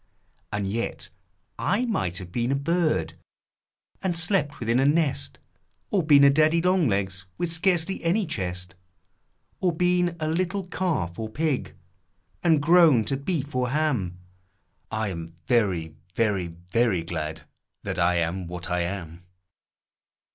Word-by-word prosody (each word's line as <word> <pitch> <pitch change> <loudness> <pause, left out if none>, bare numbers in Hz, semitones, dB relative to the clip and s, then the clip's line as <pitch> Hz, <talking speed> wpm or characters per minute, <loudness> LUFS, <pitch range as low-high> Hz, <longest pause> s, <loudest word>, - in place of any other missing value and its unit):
And 100 -1 -2
yet 115 +4 -3 0.5
I 230 +5 +1
might 95 - -1
have 90 -2 -7
been 120 +5 -1
a - - +2
bird, 165 +3 0 0.9
And 180 -3 -1
slept 160 -4 +1
within 115 +1 +1
a 135 - +3
nest, 150 -2 +1 0.5
Or 200 - +3
been 145 -3 +6
a 140 - +8
daddy 155 +3 +4
long 180 -2 +3
legs 95 -2 -1
With 175 - -1
scarcely 175 +2 0
any 185 +5 +2
chest; 90 - -4 0.9
Or 180 - +2
been 180 0 +1
a 155 - -1
little 185 +4 -1
calf 160 - -2
or 110 -1 -3
pig, 145 +3 -2 0.7
And 160 -4 +3
grown 160 -8 +6
to 135 - -1
beef 145 0 -3
or 125 -1 0
ham; 125 - 0 0.7
I'm 90 -7 -4
very 95 -10 +1 0.2
very 100 -6 +1
very 90 +3 0
glad 80 -2 -4 0.4
That - - -3
I 90 +1 +3
am 85 +2 -1
what 85 0 -5
I 90 - +1
am 85 -1 -4
130 Hz, 140 wpm, -25 LUFS, -, 0.9 s, a